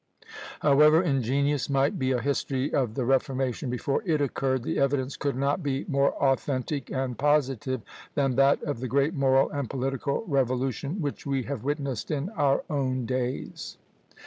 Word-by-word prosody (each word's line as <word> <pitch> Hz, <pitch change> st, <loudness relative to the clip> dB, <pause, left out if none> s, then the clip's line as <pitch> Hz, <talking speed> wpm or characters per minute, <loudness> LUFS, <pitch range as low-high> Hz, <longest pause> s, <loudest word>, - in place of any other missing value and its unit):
However 150 Hz, +4 st, +5 dB
ingenious 140 Hz, -1 st, +1 dB
might 135 Hz, +1 st, +1 dB
be 130 Hz, -1 st, +1 dB
a 125 Hz, -, +1 dB
history 140 Hz, 0 st, -1 dB
of 120 Hz, -5 st, 0 dB
the 130 Hz, -, -1 dB
Reformation 135 Hz, 0 st, 0 dB
before 125 Hz, +3 st, -1 dB
it 160 Hz, -5 st, +1 dB
occurred, 130 Hz, -2 st, 0 dB
the -, -, -1 dB
evidence 140 Hz, -1 st, 0 dB
could 140 Hz, -2 st, -2 dB
not 140 Hz, +6 st, 0 dB
be 140 Hz, -3 st, -2 dB
more 140 Hz, 0 st, +2 dB
authentic 135 Hz, 0 st, -1 dB
and 130 Hz, -2 st, -2 dB
positive 135 Hz, -3 st, +1 dB, 0.3 s
than 135 Hz, -3 st, +1 dB
that 135 Hz, +2 st, +4 dB
of 145 Hz, -5 st, -3 dB
the 130 Hz, -, -3 dB
great 140 Hz, +5 st, +1 dB
moral 135 Hz, -3 st, +3 dB
and 140 Hz, -4 st, -3 dB
political 135 Hz, -, -2 dB
revolution 135 Hz, -, -1 dB
which 145 Hz, 0 st, -4 dB
we 135 Hz, -2 st, 0 dB
have 135 Hz, -3 st, -5 dB
witnessed 140 Hz, -4 st, -2 dB
in 150 Hz, +3 st, -2 dB
our 145 Hz, -10 st, +1 dB
own 130 Hz, -4 st, -1 dB
days. 130 Hz, +1 st, -3 dB
135 Hz, 160 wpm, -27 LUFS, 130-145 Hz, 0.3 s, However